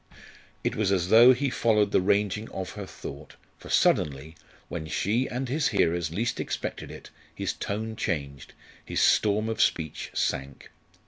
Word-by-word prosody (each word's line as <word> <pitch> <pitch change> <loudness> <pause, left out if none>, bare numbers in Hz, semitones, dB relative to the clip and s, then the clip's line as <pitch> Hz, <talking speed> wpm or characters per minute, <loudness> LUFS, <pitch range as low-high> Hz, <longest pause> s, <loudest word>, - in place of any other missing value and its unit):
It - - -1
was 105 -3 +1
as 90 -2 +1
though 120 +4 +8
he 130 +1 0
followed 105 -4 +2
the - - +3
ranging 105 +2 0
of 95 -1 -5
her 100 -2 -7
thought, 70 -3 -9 0.2
for - - -12
suddenly, 75 +2 +1 0.3
when 80 -2 -5
she 105 +10 0
and 130 +2 -3
his 145 +4 +1
hearers 85 -1 +1
least 110 +7 -2
expected - - -4
it, - - -11 0.2
his - - -2
tone 110 +2 -4
changed, 70 -9 -4 0.3
his - - -3
storm 105 +1 +3
of 115 - -1
speech 80 -2 0
sank. 70 0 -3
100 Hz, 155 wpm, -27 LUFS, 80-110 Hz, 0.3 s, though